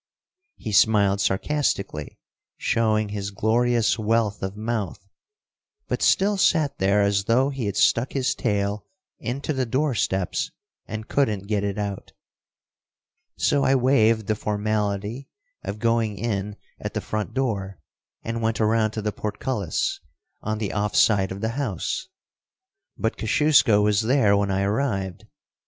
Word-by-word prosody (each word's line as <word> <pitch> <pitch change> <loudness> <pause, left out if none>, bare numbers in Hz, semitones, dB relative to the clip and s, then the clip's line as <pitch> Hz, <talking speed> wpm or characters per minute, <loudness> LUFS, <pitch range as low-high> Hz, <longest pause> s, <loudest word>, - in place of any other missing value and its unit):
He 110 - -5
smiled 100 -1 +4
sarcastically, 100 - -1 0.4
showing 110 -2 +1
his 100 -1 -4
glorious 115 +3 +1
wealth 110 -1 +1
of 95 +2 -4
mouth, 110 -4 -3 0.8
but - - -2
still 200 +1 +3
sat 160 -6 +2
there 100 +2 +3
as 100 -1 +1
though 130 +5 +3
he 130 -6 -3
had 100 - -3
stuck 120 +3 +3
his 135 -2 +1
tail 105 -3 -1 0.3
into 135 +7 -3
the 130 -2 -1
door 135 +4 +1
steps 95 -4 -1 0.4
and 110 0 -6
couldn't 105 -9 0
get 105 -1 -1
it 100 0 -2
out. 100 -2 -4 1.2
So 140 -1 +2
I 135 - +4
waived 115 -4 +3
the 110 - +1
formality 105 +3 -2 0.3
of 100 - -4
going 115 -2 0
in 105 -3 -2 0.2
at - - -6
the - - +1
front 110 +2 -4
door, 100 -8 -2 0.5
and 115 0 -3
went 110 -1 0
around 110 0 +2
to 110 - -4
the 105 - 0
portcullis, 105 - -2 0.4
on 110 0 -2
the 105 -2 -3
off 105 0 -1
side 95 -3 +4
of 95 +1 -6
the 110 - 0
house, 130 - -3 0.9
but 110 - -1
Kosciusko 120 -3 +4
was 105 0 +3
there 110 -3 +3
when 100 0 +1
I 95 0 +1
arrived. 100 -4 -1
110 Hz, 145 wpm, -24 LUFS, 100-120 Hz, 1.2 s, smiled